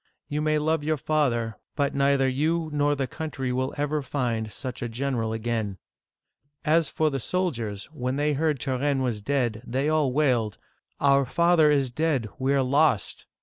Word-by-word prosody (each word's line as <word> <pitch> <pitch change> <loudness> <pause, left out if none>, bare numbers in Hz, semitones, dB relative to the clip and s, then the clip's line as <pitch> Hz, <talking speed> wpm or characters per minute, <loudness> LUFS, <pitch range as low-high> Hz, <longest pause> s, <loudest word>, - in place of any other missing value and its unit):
You 150 +1 -2
may 155 0 +2
love 155 0 0
your 155 +1 0
father, 130 -7 0 0.2
but 140 -2 0
neither 140 -1 +3
you 155 +5 0
nor 145 0 +2
the 135 -1 -1
country 135 -2 -4
will 130 +1 -1
ever 145 +1 0
find 120 -5 -2
such 130 +2 -6
a 120 - -2
general 120 -2 -2
again! 110 -3 -2 0.4
" 145 0 -39
As 165 - -3
for 155 -1 +1
the 135 - -2
soldiers, 120 - -2
when 130 -2 -2
they 150 +1 +1
heard 150 -1 0
Turenne 135 +1 0
was 115 -5 -2
dead, 120 -3 0
they 130 +4 -1
all 155 -4 +2
wailed, 125 -7 +1 0.4
"Our 140 0 +4
father 170 +2 +4
is 140 -4 +2
dead; 140 -5 0
we 135 +1 +1
are 135 - +3
lost!" 140 -4 +1
140 Hz, 175 wpm, -26 LUFS, 125-150 Hz, 0.4 s, Our